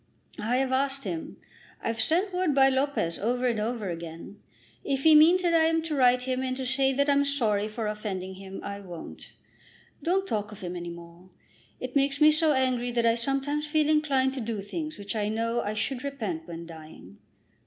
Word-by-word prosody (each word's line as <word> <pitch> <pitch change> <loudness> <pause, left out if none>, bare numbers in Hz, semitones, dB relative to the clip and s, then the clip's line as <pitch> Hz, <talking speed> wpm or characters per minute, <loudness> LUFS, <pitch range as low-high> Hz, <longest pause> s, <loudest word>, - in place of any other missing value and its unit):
"I 225 +4 0
have 265 0 0
asked 275 +1 0
him. 175 -6 -5 0.4
I've 225 0 -2
sent 365 +5 +2
word 360 -5 +1
by 270 -1 +6
Lopez 265 -11 0
over 245 +4 0
and 235 -3 +1
over 220 -1 -2
again. 170 +4 -8 0.4
If 270 -1 -1
he 320 - +7
means 335 +5 +6
that 345 -1 +2
I 325 -1 +5
am 325 0 +1
to 325 -1 -3
write 250 -2 +4
to 260 +1 -3
him 255 0 -1
and 255 -1 -2
say 265 +1 +1
that 280 +2 +1
I'm 285 0 +4
sorry 225 -8 +1
for 220 +1 -4
offending 205 -3 -4
him, 190 0 -9
I 200 0 -5
won't. 175 -4 -10 0.7
Don't 380 +3 +1
talk 210 - -3
of 210 - -11
him 180 -1 -5
any 175 -1 -5
more. 170 +1 -12 0.5
It 255 +1 -6
makes 280 0 +2
me 305 0 +7
so 310 0 +3
angry 255 -2 +1
that 235 -1 +1
I 230 - +5
sometimes 275 +5 -1
feel 300 0 +2
inclined 275 -4 +2
to 265 - -4
do 225 -2 -3
things 310 - -5
which 200 +1 -5
I 210 -1 0
know 230 +2 -1
I 210 +1 -3
should 245 +4 -2
repent 215 - -4
when 170 0 -7
dying." 160 - -12
250 Hz, 205 wpm, -27 LUFS, 205-280 Hz, 0.7 s, he